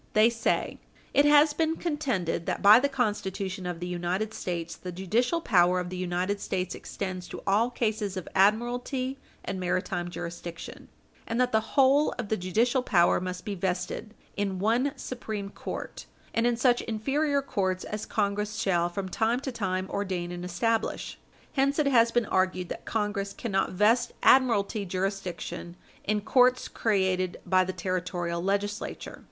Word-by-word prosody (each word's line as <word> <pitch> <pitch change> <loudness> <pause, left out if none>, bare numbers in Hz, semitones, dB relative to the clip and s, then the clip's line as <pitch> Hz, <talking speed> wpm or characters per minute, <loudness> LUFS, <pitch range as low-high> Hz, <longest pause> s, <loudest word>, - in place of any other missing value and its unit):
They 215 +2 +5
say: 230 -1 -1 0.3
"It 285 - +5
has 295 +1 +6
been 320 +1 +1
contended 260 - -2
that - - -2
by 210 +3 +9
the 280 +2 +1
Constitution 200 -6 -2
of 175 -2 -4
the 175 - -4
United 180 +5 -2
States, 170 -4 -4
the 180 - -7
judicial 225 - 0
power 180 - +4
of 180 0 -4
the - - -4
United 185 +2 -1
States 185 -1 -2
extends 185 -2 -5
to - - -8
all 210 +5 +3
cases 215 -5 -2
of 185 - -5
admiralty 245 +6 +1 0.3
and 190 - -3
maritime 180 -1 -1
jurisdiction, 170 -1 -7 0.4
and 230 +1 -1
that 250 0 +2
the 220 0 -1
whole 275 +2 +5
of 235 -5 -4
the 220 - +2
judicial 225 +8 +1
power 175 -9 +3
must 185 0 -5
be 205 - -3
vested 190 +4 -3 0.2
'in 200 -2 -1
one 235 +8 +1
Supreme 215 -6 -5
Court, - - -7 0.3
and 230 +1 +2
in 240 -1 +1
such 245 0 +3
inferior 280 +6 0
courts 190 -6 -1
as 210 +1 -5
Congress 210 0 -1
shall 180 -6 +1
from 190 +2 -4
time 225 +6 +1
to 270 - -4
time 190 -5 -2
ordain 185 -3 -2
and 175 0 -6
establish.' 220 +6 -1 0.3
Hence 275 +1 +2
it 300 - +2
has 235 -4 +4
been 240 -1 +2
argued 185 -2 0
that - - -6
Congress 205 -2 -2
cannot 195 -6 -1
vest 225 +5 +3
admiralty 225 -5 +4
jurisdiction 185 -2 -4 0.3
in 210 0 0
courts 250 +3 +3
created 190 -4 0
by 185 +1 +4
the 185 - -3
Territorial 175 -1 -2
Legislature." 200 +2 -3
205 Hz, 160 wpm, -28 LUFS, 185-235 Hz, 0.4 s, by